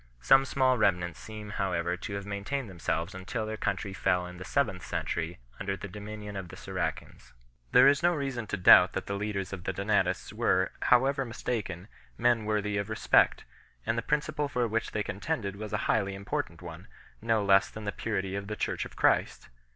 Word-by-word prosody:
Some 135 - +6
small 130 -2 +2
remnants 85 - +1
seem 105 - -8
however 90 -2 0
to 90 - -7
have 100 0 -5
maintained 105 +7 -3
themselves 85 0 -2
until 95 +4 -4
their 110 0 -4
country 100 -2 -2
fell 90 -2 +1
in 90 0 -9
the - - -6
seventh 95 -7 0
century 85 +1 -3 0.2
under 95 0 -2
the 100 - -7
dominion 105 +1 -8
of 95 -2 -5
the - - -9
Saracens. 90 -4 -5 0.4
There 125 +2 +8
is 140 0 +4
no 175 0 +3
reason 135 -6 -3
to 105 - -2
doubt 90 - +8
that - - -3
the 100 - -3
leaders 100 -2 -3
of 90 -2 -6
the - - -1
Donatists 100 +1 0
were, 95 0 +2
however 135 +3 +3
mistaken, 110 -7 -4 0.3
men 120 -2 +2
worthy 105 -1 0
of 100 +1 -2
respect; 110 - +3 0.4
and 115 - 0
the 115 - 0
principle 150 +2 -1
for 125 -3 0
which 115 +1 -1
they 105 - -2
contended 100 - -3
was 105 0 -7
a - - 0
highly 100 0 +1
important 100 +1 -4
one - - -9 0.3
no 110 -2 +1
less 100 +1 +5
than 110 - -9
the 105 - -2
purity 95 -3 -3
of 100 0 -4
the 105 - -3
Church - - -2
of - - -11
Christ. - - +1
105 Hz, 195 wpm, -29 LUFS, 95-115 Hz, 0.4 s, There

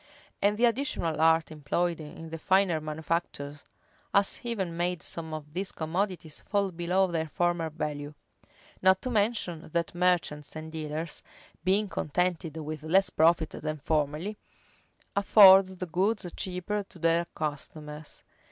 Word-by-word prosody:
And 205 +1 +3
the 240 - +4
additional 230 - 0
art 160 0 +4
employed 165 +3 -1
in 160 +1 -9
the 165 - -5
finer 185 -3 +3
manufactures 155 -2 -3 0.5
has 200 0 +2
even 195 -8 -3
made 175 -1 -1
some 160 -1 -5
of 150 -1 -7
these 190 +3 -2
commodities 170 0 -3
fall 200 -2 0
below 175 +3 +1
their 165 -3 -2
former 175 0 0
value. 150 -1 -4 0.7
Not 190 0 +5
to 255 - -2
mention, 205 -8 -1
that 170 -1 0
merchants 175 -5 0
and 155 0 -7
dealers, 155 0 -4 0.4
being 195 +4 +2
contented 170 -1 -1
with 155 -1 -5
less 180 +4 +3
profit 160 0 +3
than 155 0 -4
formerly, 155 +7 -1 0.8
afford 195 -1 +8
the 185 -1 -6
goods 190 +5 0
cheaper 185 +3 -2
to 195 - -14
their 165 +1 +2
customers. 150 0 -6
170 Hz, 135 wpm, -29 LUFS, 155-190 Hz, 0.8 s, afford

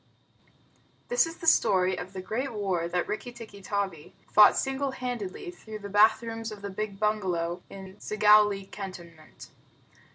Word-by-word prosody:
This - - +3
is 330 - -8
the - - -9
story 185 - +4
of 180 +1 -7
the 185 -1 -6
great 250 +8 -3
war 190 -6 -1
that 180 +1 -1
Rikki 245 +3 -4
tikki 225 -4 -11
tavi 195 -7 -4 0.2
fought 210 - +7
single 270 +1 -1
handed, 245 -7 -4 0.2
through 220 -10 -9
the 205 -1 -8
bath 215 +3 +5
rooms 225 -1 -5
of 205 -1 -10
the 200 - -4
big 200 0 -5
bungalow 185 -5 -1
in 190 0 -11
Segowlee 210 -2 +3
cantonment. 170 -5 -10
205 Hz, 155 wpm, -28 LUFS, 190-225 Hz, 0.2 s, fought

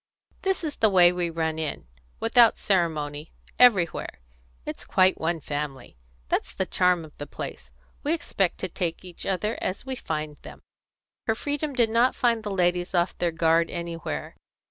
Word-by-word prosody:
"This 385 -2 0
is 300 -3 -3
the 220 - +4
way 180 -3 +6
we 180 -1 -1
run 160 -1 -2
in, 155 - -3 0.3
without 230 0 +5
ceremony, 155 -5 -1 0.3
everywhere. 200 - +4 0.5
It's - - -6
quite 185 0 +3
one 165 +1 0
family. 145 - -5 0.3
That's - - -1
the 190 - 0
charm 180 -2 +2
of 150 - -16
the 145 - -5
place. 60 0 -7 0.3
We 295 - -1
expect 195 - -1
to 185 - -1
take 175 0 -3
each 175 -2 -7
other 210 +4 -1
as 185 - -3
we 265 -1 -3
find 155 -8 -4
them." - - -13 0.6
Her 220 - +2
freedom 290 +4 -2
did 235 -3 +3
not 235 +3 +3
find 235 -2 +2
the 210 - -5
ladies 180 -1 0
off 175 +1 +1
their 175 -1 +1
guard 165 0 +2
anywhere. 165 - -5
175 Hz, 165 wpm, -26 LUFS, 160-220 Hz, 0.6 s, way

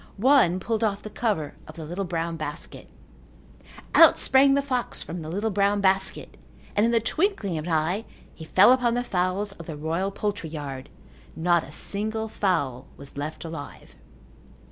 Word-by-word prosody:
One 220 -6 +4
pulled 225 +3 -2
off 205 -2 -1
the 215 - -8
cover 205 -12 -1
of - - -11
the 160 -2 -7
little 180 +5 -4
brown 170 -1 -2
basket. 155 0 -7 1.0
Out - - +8
sprang 275 +1 +4
the 280 - +1
fox 255 -3 -2
from 170 +1 -6
the 155 - -7
little 205 +6 -1
brown 200 +1 +2
basket 190 -1 +1 0.4
and 205 - +3
in - - +1
the 230 - +3
twinkling 230 - -1
of 155 - -6
an - - -2
eye 170 +8 0 0.3
he 160 - -11
fell 190 +8 +6
upon 245 -2 +3
the 245 - 0
fowls 190 -1 -1
of 170 -5 -12
the 155 -3 -6
royal 165 +6 -1
poultry 200 -4 -3
yard. 140 -4 -7 0.5
Not 170 0 +2
a 145 - -11
single 220 +6 -2
fowl 145 - -1
was 140 0 -10
left 150 +4 -5
alive. 160 - -9
190 Hz, 175 wpm, -25 LUFS, 160-220 Hz, 1.0 s, Out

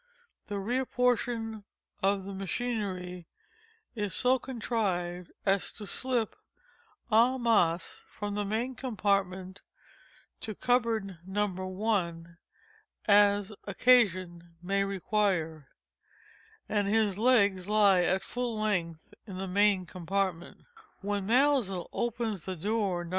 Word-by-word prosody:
(the 205 - -3
rear 240 +7 0
portion 235 -3 0 0.4
of 195 0 +1
which 195 0 -6
machinery 190 -4 -3 0.7
is 210 -5 -3
so 255 +1 +3
contrived 195 -9 -2
as 195 -1 +2
to 210 - -7
slip 245 +1 -1 0.8
_en 240 +4 +4
masse, 180 -8 +1 0.2
_from 205 -1 -2
the 205 0 -1
main 225 +6 -2
compartment 200 -6 -1 0.8
to 215 -2 -5
the - - -37
cupboard 225 -7 +1
No. 190 0 -2
I, 185 -7 +2 0.9
as 205 0 +4
occasion 185 -7 +2
may 195 +2 +1
require,) 190 -6 -1 1.0
and 205 -2 0
his 210 -2 +2
legs 200 -6 +3
lie 205 -3 +5
at 190 +2 +1
full 240 -1 -3
length 170 -7 -2
in 190 -3 -7
the 190 +1 -4
main 200 0 +3
compartment. 180 0 -3 0.4
When 200 -1 -2
Maelzel 245 -7 +2
opens 230 -6 -2
the 185 - -3
door 195 -1 -1
No. - - -9
200 Hz, 115 wpm, -30 LUFS, 185-225 Hz, 1.0 s, lie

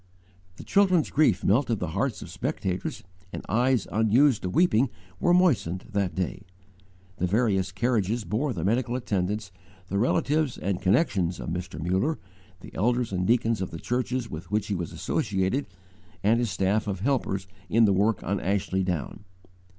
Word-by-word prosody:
The - - -10
children's 185 -5 +3
grief 130 - +3
melted 115 +2 +2
the 90 -4 -3
hearts 110 +3 -1
of - - -10
spectators, 90 -1 -3 0.3
and - - -7
eyes 120 +1 +2
unused 115 +4 +3
to 90 - -3
weeping 135 - +3 0.3
were 175 - +2
moistened 140 - +2
that 100 -3 -1
day. 95 +1 -2 0.8
The 90 - 0
various 100 -2 +1
carriages 110 +1 0
bore 125 +8 -1
the 85 -9 -4
medical 120 +3 +1
attendants, 105 -3 -2 0.4
the 100 - 0
relatives 145 +4 +1
and 95 0 -2
connections 95 - +1
of - - -5
Mr. 90 -2 -5
Muller, 95 - 0 0.4
the - - -12
elders 120 +2 +1
and 90 0 0
deacons 115 -2 +2
of 95 - -2
the 80 - -7
churches 125 +4 -2
with 85 -1 -8
which 105 +2 -1
he - - 0
was 85 -3 -4
associated, 100 +6 -1 0.6
and 110 +4 +4
his 120 -2 0
staff 100 +3 0
of 95 -2 -3
helpers 110 -6 0 0.2
in 115 +1 +5
the 100 - +4
work 105 +4 +1
on 100 +1 -1
Ashley 95 0 0
Down. 90 +2 -3
105 Hz, 165 wpm, -26 LUFS, 95-125 Hz, 0.8 s, in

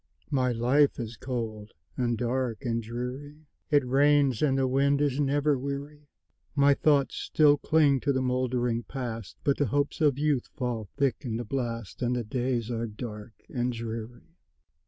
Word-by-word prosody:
My 130 -3 +2
life 130 +6 +3
is 115 -1 -5
cold, 110 -3 -5 0.2
and 120 -2 0
dark, 125 +1 -2
and 115 -1 0
dreary; 125 +7 -6 0.2
It 145 -3 +3
rains, 140 -1 +3
and 135 -3 +3
the 135 -1 +2
wind 140 +2 +2
is 145 -2 +1
never 145 0 +2
weary; 140 +2 -6 0.5
My 140 0 +5
thoughts 140 -1 +2
still 150 -2 +4
cling 145 -2 +3
to 140 - 0
the 130 - +1
moldering 125 -2 0
Past, 115 -5 -6
But 140 - +2
the 145 - +1
hopes 145 +7 -1
of 145 -4 +3
youth 145 -4 +1
fall 120 -7 -3
thick 135 -2 +2
in 120 -5 -3
the 120 - -4
blast, 115 -3 -4
And 125 0 +1
the 120 - -1
days 120 0 -2
are 115 0 -2
dark 105 0 -8
and 125 0 -1
dreary. 115 +4 -7
130 Hz, 165 wpm, -28 LUFS, 120-140 Hz, 0.5 s, My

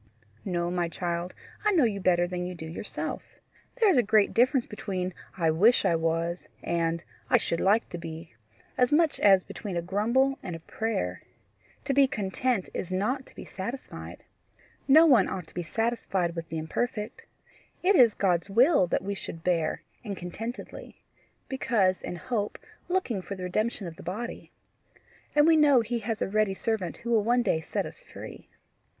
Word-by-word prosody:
"No, 175 -2 -1
my 175 -1 0
child; 175 +1 -3 0.3
I 425 - +3
know 330 -6 +4
you 210 -4 +1
better 175 -2 +3
than 180 0 -3
you 180 0 -5
do 160 - -8
yourself. 160 +6 -5 0.5
There 460 -3 +3
is 375 - +5
a - - +7
great 210 -2 +3
difference 255 +1 +3
between 185 -3 -4 0.2
I 165 -3 +2
WISH 210 +10 +4
I 170 - +3
WAS 165 +1 -1 0.2
and 170 0 0 0.3
I - - +6
SHOULD 170 - -1
LIKE 210 +4 +3
TO 175 - -6
BE 165 -2 -8 0.5
as 250 -1 +4
much 315 +1 +3
as 195 -2 +6
between 195 -5 -6
a - - 0
grumble 235 +9 +1
and 175 -3 -5
a - - -7
prayer. 95 - -3 0.6
To 275 - 0
be 275 0 +5
content 215 -2 -1
is 185 - -4
not 250 +9 -1
to - - -19
be - - -9
satisfied. 235 +8 -7 0.6
No 310 +4 +8
one 250 - +5
ought 185 -3 -4
to - - -21
be 175 - -3
satisfied 195 -3 -1
with 165 -1 -5
the 160 - -3
imperfect. 220 - -3 0.6
It 390 +2 +5
is 240 -7 +6
God's 180 -1 +1
will 240 - +5
that 175 - 0
we 200 +1 -2
should 165 -4 -8
bear, 165 -3 0 0.2
and 200 -4 -5
contentedly 225 +8 -7 0.4
because 210 -8 +1
in - - -5
hope, 210 +1 -3 0.3
looking 350 - 0
for 200 - -6
the 185 - -7
redemption 215 +3 -1
of 165 -1 -8
the - - -10
body. 215 +8 -6 0.8
And 295 0 +6
we 325 0 +6
know 285 -5 +6
he 235 +1 -2
has 225 0 -2
a - - -1
ready 210 -1 +1
servant 200 -5 -2
who 235 0 -5
will 220 -3 +4
one 240 +2 +3
day 160 - +1
set - - -2
us - - -9
free." - - -11
200 Hz, 180 wpm, -28 LUFS, 175-240 Hz, 0.8 s, No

